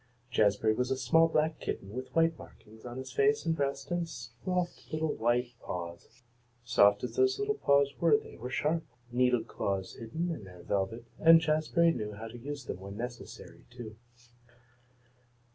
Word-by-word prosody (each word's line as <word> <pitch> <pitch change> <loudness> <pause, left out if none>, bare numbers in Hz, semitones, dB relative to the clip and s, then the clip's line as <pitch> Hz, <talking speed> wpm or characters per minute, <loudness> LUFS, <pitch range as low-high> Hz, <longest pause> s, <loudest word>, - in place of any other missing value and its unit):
Jazbury 110 +1 +3
was 125 +2 0
a 135 - 0
small 150 +6 +4
black 155 0 +1
kitten 95 - -4
with 130 +3 -5
white 165 0 +4
markings 110 +1 -14
on 120 +1 -7
his 130 - -6
face 430 +1 +2
and 165 - +1
breast, 140 -1 -2
and 175 -1 -1
soft 145 +10 -4
little 155 -1 0
white 120 +2 +1
paws. 85 +7 -7 0.4
Soft 105 -3 +4
as 125 - -4
those 390 0 +3
little 415 +1 0
paws 140 - +3
were 165 -4 +5
there - - -11
were 125 +3 -5
sharp, 155 +5 0 0.3
needle 125 -1 +3
claws 95 -3 -3
hidden 160 +10 -3
in 155 -10 -5
their 90 -2 -12
velvet, 100 +5 -2
and 165 0 +8
Jazbury 160 +2 +3
knew 105 -5 -4
how 110 +2 -7
to 120 +2 -10
use 140 +1 -6
them - - -5
when 100 +1 -8
necessary, 120 +1 -8
too. 120 -3 -9
125 Hz, 170 wpm, -31 LUFS, 110-160 Hz, 0.4 s, and